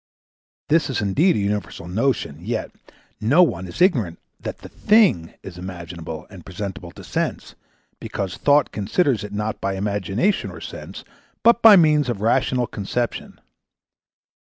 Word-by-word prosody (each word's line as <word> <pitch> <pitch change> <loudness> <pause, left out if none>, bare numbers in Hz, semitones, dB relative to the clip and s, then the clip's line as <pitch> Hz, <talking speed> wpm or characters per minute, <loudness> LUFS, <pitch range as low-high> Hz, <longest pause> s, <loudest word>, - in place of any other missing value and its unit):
This 160 0 +2
is 130 - -1
indeed 125 - +2
a - - 0
universal 100 -4 -3
notion, 90 - -1
yet 110 +2 -3 0.5
no 145 +12 +5
one 95 - -1
is 125 - 0
ignorant 115 - +2 0.2
that - - -6
the - - -12
thing 205 - +3
is 90 -2 -9
imaginable 85 -3 -7
and 95 -4 -11
presentable 95 -1 -6
to - - -12
Sense, - - -3 0.5
because 95 -3 -4
Thought 145 0 +3
considers 115 - 0
it 105 - -7
not 105 +1 -3
by 95 0 -1
Imagination 100 - -1
or - - -10
Sense, - - -9 0.4
but 235 +1 +5
by 220 -2 +9
means 150 -6 +4
of 115 -5 -2
rational 125 +3 +1
conception. 115 +3 -4
105 Hz, 145 wpm, -22 LUFS, 95-145 Hz, 0.5 s, by